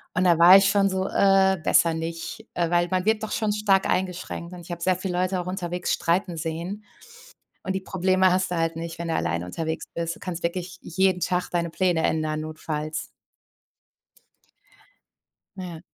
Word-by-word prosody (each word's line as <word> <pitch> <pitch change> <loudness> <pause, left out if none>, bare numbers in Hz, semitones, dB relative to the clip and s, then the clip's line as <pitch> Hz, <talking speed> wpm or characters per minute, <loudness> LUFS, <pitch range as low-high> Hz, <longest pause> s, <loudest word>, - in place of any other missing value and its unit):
Und 185 - +2
da 170 -2 +4
war 180 +3 +10
ich 195 -1 +4
schon 200 -1 +3
so: 190 0 -1
„Äh, 195 -1 +4
besser 165 -1 +4
nicht.“ 165 +7 -5
Äh, 170 -1 0
weil 175 0 +3
man 185 +1 0
wird 220 0 +2
doch 220 - -4
schon 215 -2 0
stark 200 -2 +2
eingeschränkt, 180 -1 -3
und 180 - -9
ich 175 +1 -11
habe 170 0 -5
sehr 185 +1 +2
viele 185 0 -4
Leute 185 0 0
auch 175 - -4
unterwegs 180 -1 -2
streiten 175 0 0
sehen, 170 +6 -4 0.8
und 190 - -2
die 190 - -2
Probleme 185 0 +2
hast 185 0 +1
du 180 - -2
halt 165 0 0
nicht, 165 0 -6
wenn 170 0 -4
du - - 0
alleine 85 +1 -1
unterwegs 160 - -4
bist. 170 0 -3
Du - - -17
kannst 175 -2 -5
wirklich 175 +1 -4
jeden 190 +1 +1
Tag 180 0 -1
deine 170 -1 0
Pläne 175 -1 +1
ändern, 155 -1 0
notfalls. 155 0 -4 2.5
Ja. 175 -4 -7
180 Hz, 185 wpm, -25 LUFS, 165-190 Hz, 2.5 s, war